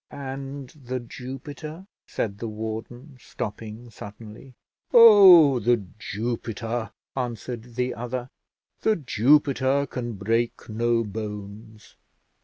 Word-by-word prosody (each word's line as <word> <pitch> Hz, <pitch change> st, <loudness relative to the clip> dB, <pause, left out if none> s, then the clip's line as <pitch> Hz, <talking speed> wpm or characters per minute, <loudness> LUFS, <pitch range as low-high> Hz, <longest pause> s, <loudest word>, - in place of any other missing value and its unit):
"And 135 Hz, -1 st, -7 dB
The 130 Hz, -5 st, -6 dB
Jupiter?" 140 Hz, +8 st, -8 dB, 0.2 s
said 100 Hz, -2 st, -3 dB
the 115 Hz, -, -4 dB
warden, 110 Hz, +5 st, -7 dB
stopping 115 Hz, 0 st, -7 dB
suddenly. 110 Hz, +5 st, -11 dB, 0.4 s
"Oh! 190 Hz, -, +9 dB
The 115 Hz, -2 st, +1 dB
Jupiter," 115 Hz, +1 st, -4 dB, 0.2 s
answered 120 Hz, -1 st, -5 dB
the 125 Hz, 0 st, -1 dB
other. 125 Hz, +2 st, -5 dB, 0.5 s
"The 220 Hz, -, +2 dB
Jupiter 140 Hz, -, +2 dB
can 120 Hz, -3 st, -5 dB
break 115 Hz, +4 st, -1 dB
no 115 Hz, +1 st, +1 dB
bones. 105 Hz, +1 st, -8 dB
120 Hz, 95 wpm, -25 LUFS, 110-135 Hz, 0.5 s, Oh